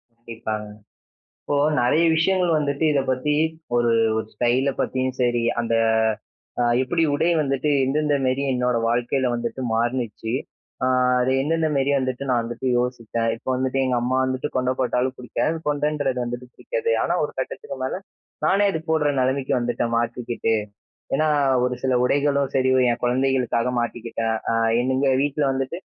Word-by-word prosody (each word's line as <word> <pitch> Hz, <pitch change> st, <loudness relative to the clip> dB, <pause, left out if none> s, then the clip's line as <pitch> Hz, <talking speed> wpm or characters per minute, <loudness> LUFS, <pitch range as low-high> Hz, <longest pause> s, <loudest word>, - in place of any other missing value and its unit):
கண்டிப்பாங்க. 115 Hz, -2 st, -5 dB, 0.8 s
இப்போ 145 Hz, -, -1 dB, 0.3 s
நிறைய 145 Hz, +7 st, +3 dB
விஷயங்கள் 180 Hz, +1 st, +2 dB
வந்துட்டு 145 Hz, +1 st, -1 dB
இத 140 Hz, -, +2 dB
பத்தி, 130 Hz, +3 st, 0 dB, 0.4 s
ஒரு 120 Hz, -1 st, +2 dB, 0.3 s
ஒரு 110 Hz, -, -2 dB
ஸ்டைல்ல 125 Hz, +4 st, +1 dB
பத்தியும் 130 Hz, 0 st, -1 dB
சரி, 120 Hz, -1 st, +1 dB, 0.2 s
அந்த 115 Hz, -1 st, -1 dB, 0.9 s
அ -, -, +3 dB, 0.2 s
எப்பிடி 165 Hz, +5 st, 0 dB
உடை 165 Hz, +4 st, +2 dB
வந்துட்டு 140 Hz, +1 st, 0 dB, 0.2 s
எந்தெந்த 150 Hz, +2 st, +1 dB
மாரி 130 Hz, +2 st, 0 dB
என்னோட 125 Hz, -1 st, +1 dB
வாழ்க்கையில 120 Hz, +2 st, 0 dB
வந்துட்டு 120 Hz, +2 st, -3 dB
மாறினுச்சு, 115 Hz, -1 st, -2 dB, 0.5 s
ஆ -, -, +3 dB, 0.4 s
அது 130 Hz, +1 st, +1 dB
எந்தெந்த 160 Hz, +2 st, +1 dB
மாரி 135 Hz, +1 st, +2 dB
வந்துட்டு, 130 Hz, +1 st, -3 dB
நான் 120 Hz, -2 st, +2 dB
வந்துட்டு 120 Hz, +2 st, -4 dB
யோசிச்சேன். 120 Hz, -2 st, -1 dB
இப்போ 130 Hz, -, -7 dB
வந்துட்டு 130 Hz, +1 st, -1 dB
எங்க 125 Hz, -1 st, +1 dB
அம்மா 130 Hz, +2 st, 0 dB
வந்துட்டு 130 Hz, +3 st, -2 dB
கொண்ட 130 Hz, 0 st, +1 dB
போட்டாலும் 130 Hz, 0 st, 0 dB
பிடிக்காது. 155 Hz, +6 st, -2 dB
கொன்டன்றது 145 Hz, -3 st, 0 dB
வந்துட்டு 120 Hz, +1 st, -6 dB
பிடிக்காது. 485 Hz, -2 st, -2 dB
ஆனா, -, -, 0 dB
ஒரு -, -, -2 dB
கட்டத்துக்கு -, -, -5 dB
மேல -, -, -3 dB, 0.4 s
நானே 200 Hz, +2 st, +3 dB
அது 160 Hz, -, -2 dB
போட்ற 155 Hz, -2 st, +2 dB
நிலைமைக்கு 130 Hz, +1 st, 0 dB
வந்துட்டேன், 120 Hz, -1 st, -1 dB
மாத்திக்கிட்டு. 120 Hz, -1 st, -1 dB, 0.6 s
ஏன்னா, 155 Hz, +3 st, +2 dB, 0.4 s
ஒரு 125 Hz, 0 st, -1 dB
சில 130 Hz, -1 st, +1 dB
உடைகளும் 140 Hz, 0 st, +1 dB
சரி, 130 Hz, 0 st, +3 dB, 0.2 s
என் 120 Hz, -, -4 dB
குழந்தைகளுக்காக 125 Hz, -1 st, +1 dB
மாட்டிக்கிட்டேன். 115 Hz, -1 st, -2 dB, 0.2 s
ஆ -, -, +1 dB, 0.3 s
எங்க 130 Hz, +1 st, +1 dB
வீட்ல 145 Hz, +1 st, -1 dB
வந்துட்டு 135 Hz, +4 st, -3 dB
130 Hz, 150 wpm, -23 LUFS, 120-140 Hz, 0.9 s, நிறைய